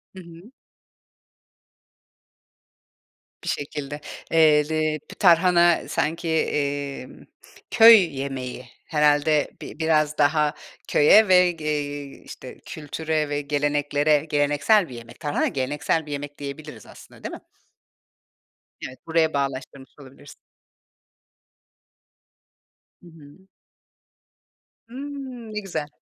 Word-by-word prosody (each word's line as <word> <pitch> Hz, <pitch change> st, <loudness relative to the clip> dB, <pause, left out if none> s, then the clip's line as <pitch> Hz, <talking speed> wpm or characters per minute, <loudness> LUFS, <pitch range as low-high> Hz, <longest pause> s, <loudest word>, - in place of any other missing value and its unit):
Hı -, -, -9 dB
hı. 170 Hz, +6 st, -15 dB, 2.9 s
Bir -, -, -4 dB
şekilde. 145 Hz, 0 st, -5 dB, 0.3 s
Eee, 155 Hz, -2 st, +4 dB
le 155 Hz, -1 st, -1 dB
p -, -, -15 dB
tarhana 175 Hz, -1 st, +4 dB
sanki, 165 Hz, +3 st, -2 dB
emm, 145 Hz, -3 st, -3 dB, 0.5 s
köy 225 Hz, -9 st, +7 dB
yemeği, 130 Hz, -2 st, -5 dB, 0.2 s
herhâlde, 150 Hz, 0 st, +2 dB
bi -, -, -10 dB
biraz 155 Hz, -2 st, +1 dB
daha 150 Hz, 0 st, +2 dB, 0.3 s
köye 205 Hz, +9 st, +5 dB
ve 180 Hz, -1 st, +5 dB
ge 160 Hz, -3 st, -10 dB
eee, 145 Hz, -2 st, -4 dB
işte, 130 Hz, -, -11 dB
kültüre 155 Hz, 0 st, -3 dB
ve 145 Hz, 0 st, -2 dB
geleneklere 145 Hz, +1 st, 0 dB
geleneksel 145 Hz, +6 st, +2 dB
bir 125 Hz, -, -9 dB
yemek. 115 Hz, 0 st, -12 dB
Tarhana 145 Hz, -1 st, -1 dB
geleneksel 145 Hz, +4 st, -2 dB
bir 150 Hz, -, -10 dB
yemek 145 Hz, 0 st, -6 dB
diyebiliriz 145 Hz, +2 st, -9 dB
aslında, -, -, -16 dB
değil -, -, -6 dB
mi? -, -, -13 dB, 1.5 s
Evet, 130 Hz, 0 st, -13 dB
buraya 160 Hz, -1 st, +1 dB
bağlaştırmış 135 Hz, -1 st, -4 dB
olabilirsin. 140 Hz, +1 st, -15 dB, 2.7 s
Hı -, -, -15 dB
hı. 165 Hz, +3 st, -17 dB, 1.4 s
Imm. 260 Hz, -3 st, -8 dB
Ne 210 Hz, -, -2 dB
güzel. 160 Hz, -7 st, -5 dB
150 Hz, 100 wpm, -23 LUFS, 145-165 Hz, 2.9 s, köy